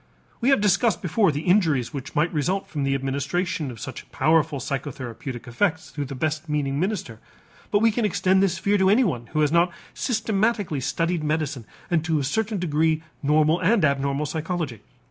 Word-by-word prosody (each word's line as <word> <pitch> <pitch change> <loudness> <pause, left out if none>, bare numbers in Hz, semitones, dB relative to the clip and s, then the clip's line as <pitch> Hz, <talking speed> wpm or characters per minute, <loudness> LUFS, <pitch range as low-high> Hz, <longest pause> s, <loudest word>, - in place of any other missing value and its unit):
We 250 - +2
have 270 -7 +4
discussed 205 +1 +2
before 190 +1 +2
the 145 0 -3
injuries 160 - +2
which 140 -1 -6
might 155 +4 +1
result 180 +6 0
from 150 - -5
the 135 0 +1
administration 140 +5 -2
of 120 -3 -9
such - - -8
powerful 155 -2 +2
psychotherapeutic 130 -3 -5
effects 160 +6 -1
through 145 -1 -4
the 135 0 -7
best 155 +3 -2
meaning 145 -2 -1
minister, 175 - -2 0.5
but 205 +1 +2
we 225 - +5
can 235 +2 -1
extend 190 -2 +2
this 190 -3 +2
fear 200 +3 +1
to 190 0 +4
anyone 180 - +2
who 155 - +2
has 150 -1 +2
not 170 +1 +3 0.2
systematically 215 - 0
studied 165 +5 -1
medicine 150 -5 -2 0.3
and 165 -3 +2
to 160 -2 +1
a 145 - 0
certain 215 - -1
degree 160 -2 +1 0.2
normal 155 +3 +3
and 190 0 +3
abnormal 140 +1 0
psychology. 155 - -3
155 Hz, 180 wpm, -24 LUFS, 140-190 Hz, 0.5 s, we